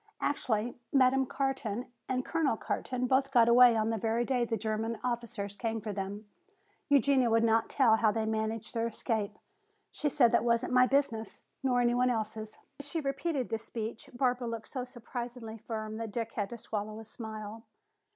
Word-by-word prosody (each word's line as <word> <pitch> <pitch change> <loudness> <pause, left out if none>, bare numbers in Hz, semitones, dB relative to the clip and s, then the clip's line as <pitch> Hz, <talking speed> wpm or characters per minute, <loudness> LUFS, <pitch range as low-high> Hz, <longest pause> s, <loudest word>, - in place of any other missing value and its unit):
Actually 235 -4 -1 0.2
Madame 265 -1 +4
Carton 255 -5 -2 0.2
and 255 0 0
Colonel 315 -8 +1
Carton 255 +2 -2
both 265 +2 +2
got 240 -4 +5
away 240 0 +7
on 220 0 +1
the 225 - -1
very 230 +3 +1
day 250 -2 +1
the 230 -1 -1
German 220 +2 -2
officers 235 -5 -3
came 225 0 -2
for 215 -1 -5
them. 200 +2 -5 0.6
Eugenia 275 -3 +4
would 225 0 +3
not 225 0 +3
tell 235 -5 +4
how 220 -1 +3
they 220 0 -1
managed 220 0 -2
their 230 -1 0
escape. 220 -2 -2 0.5
She 300 - -1
said 245 -4 +4
that - - +3
wasn't 235 +1 +1
my 250 0 +6
business, 230 -6 0 0.2
nor 250 -2 +2
any 240 0 +3
one 250 +1 +3
else's." 220 -2 -3 0.2
As 285 - -6
she 325 - -1
repeated 275 -1 -2
this 225 0 -2
speech, 225 0 -5
Barbara 250 -1 0
looked 230 -1 -5
so 255 -3 -3
surprisingly 240 -2 -7
firm 220 -1 -5
that 225 -1 -4
Dick 230 +1 -3
had 205 -3 -2
to 235 - -7
swallow 215 -1 -4
a 225 - -9
smile. 220 0 -7
230 Hz, 180 wpm, -31 LUFS, 220-255 Hz, 0.6 s, away